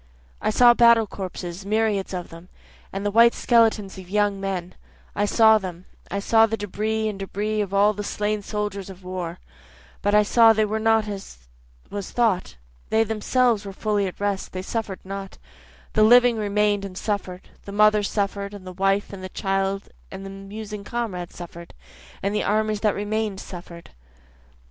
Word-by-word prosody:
I - - +1
saw 240 +2 +6
battle 235 -1 +6
corpses, 185 -2 -6
myriads 210 -1 0
of 180 -2 -5
them, 165 +2 -13 0.4
And 195 +1 -4
the 205 - +1
white 235 +2 +6
skeletons 220 -5 +2
of 180 -1 -12
young 205 0 +1
men, 185 -2 -3 0.4
I 205 - +1
saw 220 +1 +5
them, 185 -2 -7 0.2
I 200 - -3
saw 225 +2 +4
the 225 0 -2
debris 215 +2 -2
and 205 -2 -4
debris 210 +2 -2
of 200 -2 -3
all 200 +2 +4
the 205 0 -5
slain 210 +1 -2
soldiers 205 -2 -4
of 190 0 -11
the 180 - -13
war, 180 -2 -4 0.6
But 205 +1 +2
I 210 - +6
saw 225 +2 +6
they 215 0 +2
were 215 +1 -2
not 225 -1 +2
as 190 - -8 0.4
was 200 -2 -5
thought, 220 - 0 0.3
They 220 0 +3
themselves 225 +1 +1
were 195 -1 -7
fully 205 -1 0
at 185 - -8
rest, 200 -1 -2
they 185 0 -4
suffer'd 210 -2 -4
not, 195 0 -7 0.6
The 215 - +3
living 245 +2 +6
remain'd 210 -1 +1
and 190 -2 -7
suffer'd, 195 -4 -4 0.2
the 200 - -7
mother 210 +1 +4
suffer'd, 200 0 -2
And 195 -2 -11
the 185 - -7
wife 195 +2 0
and 190 -1 -8
the 185 - -5
child 195 0 -2 0.2
and 195 0 -8
the 195 - -7
musing 200 +1 -8
comrade 205 -7 -4
suffer'd, 170 -1 -10 0.5
And 200 +1 0
the 210 - +1
armies 215 0 +1
that 210 -1 +1
remain'd 210 -1 -2
suffer'd. 170 -2 -10
205 Hz, 180 wpm, -24 LUFS, 195-215 Hz, 0.6 s, saw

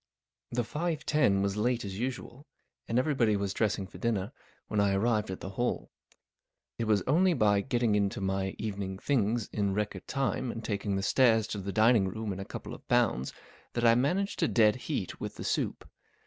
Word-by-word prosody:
T - - 0
HE - - +3
five 155 +5 -3
ten 100 -11 +3
was 100 +1 -1
late 120 +1 0
as 95 0 -5
usual, 130 +2 -5 0.4
and 115 - 0
every¬ 145 +3 +2
body 115 -5 +3
was 100 -1 -2
dressing 105 -3 0
for 95 - -12
dinner 110 -2 -1 0.4
when 105 - -1
I 100 -1 +3
arrived 105 0 +1
at 95 - -5
the 95 - -6
Hall. 120 +5 -2 0.9
It 115 - 0
was 105 -2 +2
only 175 +5 +3
by 105 -5 +3
getting 120 -2 +1
into 100 -1 +1
my 95 0 -1
evening 100 -3 -4
things 115 -2 0
in 100 -2 0
record 105 -2 -3
time 130 -1 -1
and 115 - -7
taking 100 -1 -1
the 95 - -1
stairs 115 0 +4
to 105 - -3
the 100 +1 -4
dining¬ 110 -1 +4
room 110 0 -3
in 95 - -7
a 95 - -5
couple - - -7
of - - -12
bounds 65 +2 +2 0.4
that 120 0 0
I 115 - +7
man¬ 140 +11 +2
aged 200 - -6
to 165 - +3
dead 110 -2 +4
heat - - -4
with - - -5
the - - -7
soup. - - -2
110 Hz, 205 wpm, -30 LUFS, 100-125 Hz, 0.9 s, I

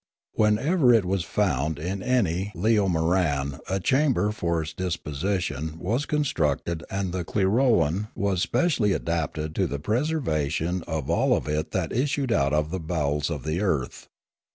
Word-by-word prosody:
Whenever 125 +7 +3
it 115 -5 +4
was 95 -1 0
found 75 +2 0
in 95 +6 -4
any 100 -6 0
leomoran 85 -7 +1
a 95 +1 0
chamber 130 -3 +2
for 85 -5 -1
its 80 +1 -7
deposition 80 -2 -3
was 115 - -1
constructed 85 - 0
and 95 -2 -2
the 90 -1 -2
clirolan 100 - +2
was 95 -2 0
specially 120 - +2
adapted 80 -2 -2
to - - +1
the 70 - -3
preservation 90 - -1
of 80 -5 -3
all - - +3
of - - -5
it 75 +1 -1
that 90 -4 -2
issued 135 0 0
out 70 -9 +2
of 75 +1 0
the 95 - -2
bowels 75 -2 -1
of 75 -6 -4
the 80 +4 -1
earth. 75 -11 -2
90 Hz, 150 wpm, -25 LUFS, 80-105 Hz, -, it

